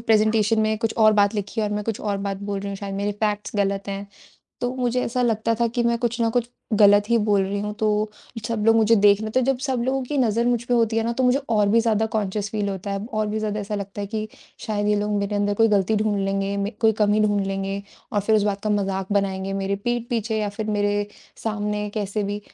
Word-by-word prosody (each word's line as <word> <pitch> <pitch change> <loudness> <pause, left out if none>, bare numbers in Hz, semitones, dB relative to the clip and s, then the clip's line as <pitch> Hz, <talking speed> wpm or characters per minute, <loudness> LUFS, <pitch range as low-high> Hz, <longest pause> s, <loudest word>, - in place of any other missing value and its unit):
Presentation 220 -1 +3
में 215 0 +1
कुछ 225 -1 -1
और 215 -1 +6
बात 205 0 +3
लिखी 210 +2 -3
है 215 - +1
और - - -4
मैं 210 0 -3
कुछ 225 -1 -3
और 205 -2 -1
बात 195 0 -3
बोल 200 0 -3
रही 200 - -5
हूँ, 200 - -4
शायद 195 0 -6
मेरी 200 +1 -1
फैक्ट्स 210 0 -2
गलत 200 0 0
हैं। 200 0 -4 0.5
तो 245 0 -1
मुझे 250 -1 0
ऐसा 250 +2 -1
लगता 230 -1 +1
था 235 +1 +1
कि 240 - +1
मैं 235 0 +2
कुछ 240 0 -1
ना 230 - +3
कुछ 235 0 0 0.3
गलत 205 0 +6
ही 235 - +5
बोल 205 -2 +3
रही 195 +1 -2
हूँ, 210 0 -3
तो 215 0 0 0.4
सब 230 -3 -2
लोग 225 0 +6
मुझे 225 0 +5
देख 205 0 +5
रहे 220 0 -4
तो 255 - +2
जब 260 0 +1
सब 255 -3 0
लोगों 265 +1 0
की 290 +4 -3
नज़र 235 -2 +2
मुझ 240 -1 +1
पे 245 - 0
होती 225 -1 +2
है 225 - +2
ना 235 - 0
तो 255 +2 0
मुझे 250 +2 +4
और 210 -3 +3
भी 230 +3 +4
ज़्यादा 220 -1 +1
कॉन्शियस 205 -1 -1
फील 210 -1 -1
होता 195 0 -4
है 200 +1 -3
और 215 0 0
भी 210 +1 -2
ज़्यादा 215 -1 -2
ऐसा 205 +1 -4
लगता 200 0 -5
है 200 - -3
कि 215 +1 -3 0.4
शायद 205 -2 -1
ये 210 - +3
लोग 210 0 -2
मेरे 200 +1 -2
अंदर 205 0 +1
कोई 225 - +6
गलती 205 0 +2
ढूँढ 210 -1 +1
लेंगे, 195 0 -1
म 200 0 -1
कोई 225 -1 +4
कमी 210 +1 +3
ढूँढ 205 -1 +2
लेंगे 195 0 -3 0.3
और 205 - +2
फिर 215 +2 +2
उस 210 - +2
बात 200 -1 -1
का 215 - +1
मजाक 195 -1 -1
बनाएँगे 195 -1 0
मेरे 195 0 -1
पीठ 240 -1 -1
पीछे 225 -2 -1
या 210 -1 -1
फिर 215 - -2
मेरे 205 0 +1 0.4
सामने 210 -1 -2
कैसे 210 0 -2
भी 205 +1 -3
210 Hz, 260 wpm, -23 LUFS, 200-225 Hz, 0.5 s, और